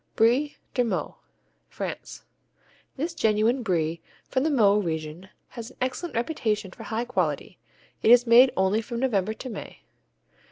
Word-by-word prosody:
Brie 250 +7 +2 0.2
de 250 - +2
Meaux 235 - -3 0.5
France - - -7 0.7
This 325 +5 -2
genuine 220 0 +2
Brie 165 -6 -1 0.3
from 260 - 0
the 310 - +1
Meaux 210 -8 +4
region 160 0 -4 0.2
has 235 -1 -8
an - - -19
excellent 260 +7 -3
reputation 225 - -1
for - - -13
high 230 +2 -3
quality. 245 - -2 0.4
It - - +3
is 245 +1 +7
made 245 +2 +7
only 190 +3 +2
from 235 +1 -5
November 220 -5 0
to 260 - -8
May. 210 - -9
230 Hz, 150 wpm, -26 LUFS, 200-255 Hz, 0.7 s, is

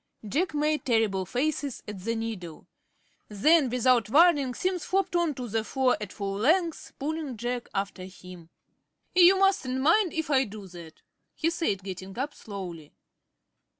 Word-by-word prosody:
Jack 315 - -1
made 300 +1 +1
terrible 215 -6 +1
faces 280 +3 -2
at 210 -2 -6
the 230 +5 -2
needle. 215 -8 -6 0.6
Then, 275 +7 +4
without 250 -2 +2
warning, 290 -3 +4
Simms 365 -2 -1
flopped 385 -1 0
on 340 -4 +1
to 250 -1 -5
the 225 0 -1
floor 260 +2 +1
at 205 -2 -6
full 200 -1 -4
length, 330 - +1
pulling 295 -3 -4
Jack 240 +2 -3
after 195 -1 -3
him. 180 -3 -12 0.6
"You 360 +1 +7
mustn't 380 -10 +2
mind 335 +7 +3
if 320 -2 -2
I 265 -1 +4
do 210 -2 -9
that," 170 -2 -12 0.3
he 330 +1 0
said, 265 - -1
getting 190 +1 -7
up 280 +4 -2
slowly. 180 -8 -8
250 Hz, 150 wpm, -27 LUFS, 200-315 Hz, 0.6 s, You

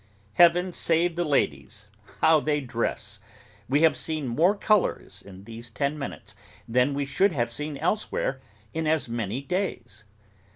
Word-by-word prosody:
Heaven 175 +3 +4
save 170 +1 +1
the 175 - 0
ladies, 105 - -1 0.3
how 160 -1 +6
they 150 0 0
dress! 115 -5 -4 0.5
We 145 +4 +3
have 160 - +5
seen 155 -4 -3
more 170 - +3
colours 200 - 0
in 95 -1 -13
these 115 +2 -10
ten 140 +7 -2
minutes, 140 -2 -7 0.3
than 125 +4 +2
we 140 0 -1
should 180 +8 +2
have 120 -4 -1
seen 150 +2 -5
elsewhere, 220 - -1 0.3
in 160 -1 -2
as 155 -4 +1
many 115 +2 -3
days. 125 - -4
145 Hz, 150 wpm, -26 LUFS, 115-165 Hz, 0.5 s, how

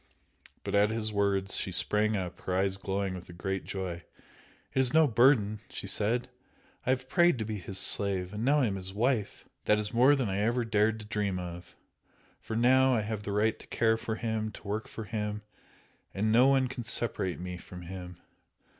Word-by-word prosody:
But - - -4
at 100 +1 +4
his 110 -1 0
words 100 -1 +1
she 95 - -1
sprang 105 +4 +1
up, 90 -2 -5
her 90 - -2
eyes 95 0 +1
glowing 95 0 -2
with 90 -1 -9
a - - -9
great 95 +2 -3
joy. 90 -3 -5 0.7
"It - - +1
is 130 +1 +3
no 160 0 +7
burden!" 115 -4 +3
she - - -7
said 120 +4 0 0.6
"I - - +1
have 130 0 0
prayed 175 -3 +4
to 110 - -3
be 105 -1 -4
his 95 +1 -4
slave 95 -1 +2
and 105 +2 -4
now 145 +3 +3
I - - +3
am 100 -4 -1
his 95 +1 -7
wife! 115 -1 -1 0.2
That 105 - +4
is 105 +1 -3
more 130 +5 +6
than 130 -5 -1
I 95 0 -1
ever 120 +3 +1
dared 110 0 +1
to - - -10
dream 105 -3 -1
of! 90 -1 -8 0.6
for 110 - -6
now 130 +2 +4
I 110 - +1
have 105 0 -4
the 100 - -5
right 105 +2 +1
to - - -14
care 115 -1 +2
for 110 0 -4
him, 110 -1 -2
to - - -12
work 105 +2 -3
for 110 - -7
him, 105 -1 -4 0.7
and 105 +3 +1
no 120 +4 +6
one 135 -1 +3
can 130 0 -6
separate 110 -5 -1
me 90 0 -5
from 90 0 -10
him! 90 0 -8
105 Hz, 210 wpm, -30 LUFS, 95-115 Hz, 0.7 s, no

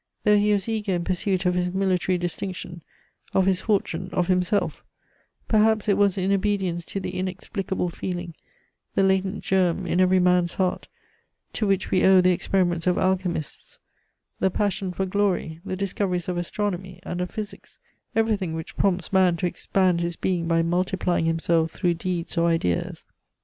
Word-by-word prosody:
Though 210 0 +5
he 210 +1 +2
was 200 -1 +1
eager 215 -3 -1
in 175 -1 -1
pursuit 185 +1 -1
of 180 - +3
his 180 0 0
military 185 -1 +1
distinction, 175 0 -4 0.5
of 190 - +4
his 190 -1 +2
fortune, 185 -4 -1
of 180 0 0
himself, 180 +2 +1 0.6
perhaps 220 -1 +3
it 200 - +4
was 200 -1 +2
in 190 +1 0
obedience 195 -3 0
to 195 - -4
the 185 - -5
inexplicable 185 0 -3
feeling, 175 0 -5 0.6
the 195 - +3
latent 190 +1 +1
germ 185 -1 +1
in 180 +1 +1
every 185 0 +4
man's 180 -1 +2
heart, 185 -1 -1 0.7
to 215 - -1
which 195 -1 0
we 185 - +3
owe 190 0 +7
the 180 0 +4
experiments 175 -1 0
of 180 - +3
alchemists, 185 -4 -2 0.6
the 190 - +3
passion 195 -1 -1
for 190 +2 -2
glory, 185 -4 -1
the 190 - -4
discoveries 185 -2 -2
of 180 - -1
astronomy 180 0 -3
and 175 - -4
of 180 - -2
physics, 215 -1 -8 0.4
everything 210 -7 +1
which 160 -1 -7
prompts 185 -2 0
man 185 -2 +4
to 180 - -2
expand 180 0 +1
his 170 0 -2
being 175 -2 -1
by 165 0 +2
multiplying 180 0 0
himself 165 0 +1
through 175 +1 0
deeds 170 0 -3
or 170 - +3
ideas. 165 - -1
185 Hz, 165 wpm, -24 LUFS, 175-195 Hz, 0.7 s, owe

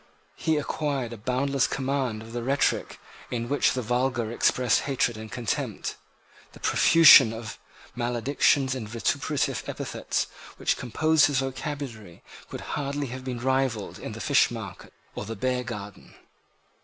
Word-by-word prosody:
He 160 -1 0
acquired 140 -4 -2
a - - -8
boundless 130 +4 0
command 130 -5 -2
of 115 +1 -12
the 120 - -3
rhetoric 135 +4 0 0.3
in 120 -1 -3
which 145 +3 +2
the 125 - -2
vulgar 120 -1 0
express 120 0 +2
hatred 130 -4 0
and 110 0 -9
contempt. 120 -4 -3 0.6
The - - -14
profusion 165 -8 +7
of 115 0 -7 0.4
maledictions 130 +3 +1
and 115 -5 -5
vituperative 115 -3 -1
epithets - - -2 0.3
which - - +1
composed 155 +6 +3
his 145 -2 0
vocabulary 135 - -5 0.3
could - - -7
hardly 140 -1 -2
have 130 0 -7
been 125 -2 -5
rivalled 130 -5 -1
in - - -6
the - - -8
fishmarket - - 0 0.2
or - - -5
the 115 +2 -5
beargarden. 120 -4 -4
125 Hz, 135 wpm, -26 LUFS, 115-135 Hz, 0.6 s, profusion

